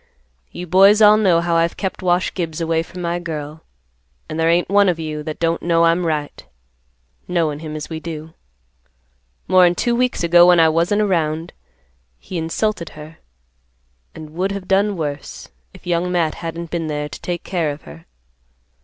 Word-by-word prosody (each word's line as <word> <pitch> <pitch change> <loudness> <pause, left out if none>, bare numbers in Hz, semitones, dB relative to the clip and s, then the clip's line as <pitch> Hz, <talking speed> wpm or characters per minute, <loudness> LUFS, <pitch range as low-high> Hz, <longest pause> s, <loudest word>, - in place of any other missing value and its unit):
You 180 - -7
boys 195 +4 +5
all 210 -1 +7
know 185 -6 +3
how 170 -1 0
I've 165 0 0
kept 190 -2 -4
Wash 180 0 +1
Gibbs 165 -3 -4
away 165 -1 0
from 180 +2 -8
my 170 +1 -1
girl, 155 -2 -6 0.7
and 155 - -5
there 165 0 +2
ain't 170 +1 +2
one 200 0 +4
of 175 - 0
you 155 -2 -5
that 155 0 -6
don't 165 0 0
know 170 -1 +2
I'm 170 +1 +2
right, 150 -2 -3 0.8
knowin' 160 -4 -1
him 155 -1 -7
as 150 - -5
we 160 -1 -6
do. 160 -1 -8 1.1
More'n 180 -1 +5
two 240 - 0
weeks 250 -5 0
ago, 175 +1 +6
when 175 -1 +6
I 160 -1 +6
wasn't 170 +6 +1
around, 165 -3 -1 0.6
he 175 - -6
insulted 170 +2 -2
her, 155 +2 -11 1.0
and 155 -1 -10
would 185 +5 -2
have 195 -2 -7
done 200 +1 +2
worse, 145 -3 -6 0.2
if - - -17
Young 175 +1 0
Matt 170 -3 +1
hadn't 165 0 -6
been 165 -2 -2
there 150 -1 -3
to - - -10
take 175 -1 -4
care 170 -5 -1
of 145 0 -7
her. 75 +1 -13
170 Hz, 180 wpm, -19 LUFS, 160-180 Hz, 1.1 s, all